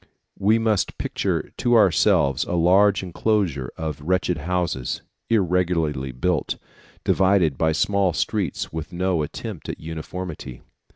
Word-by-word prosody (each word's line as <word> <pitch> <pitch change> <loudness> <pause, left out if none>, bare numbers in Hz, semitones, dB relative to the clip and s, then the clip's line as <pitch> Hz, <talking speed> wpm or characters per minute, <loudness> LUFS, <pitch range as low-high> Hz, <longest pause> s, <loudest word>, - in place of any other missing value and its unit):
We 105 +3 +4
must 110 -3 0
picture - - -2
to 120 0 +2
ourselves 85 - +4
a - - -4
large 95 +4 +4
enclosure 90 - 0
of 80 -3 -4
wretched 90 0 0
houses, 85 -6 -2 0.3
irregularly 85 - +1
built, 80 +5 -1 0.5
divided 95 -6 +3
by 80 +3 +1
small 100 +3 +2
streets 100 -2 -2
with 80 +2 -5
no 90 -1 0
attempt 75 - -6
at - - -5
uniformity. 80 -4 -7
90 Hz, 120 wpm, -23 LUFS, 80-95 Hz, 0.5 s, We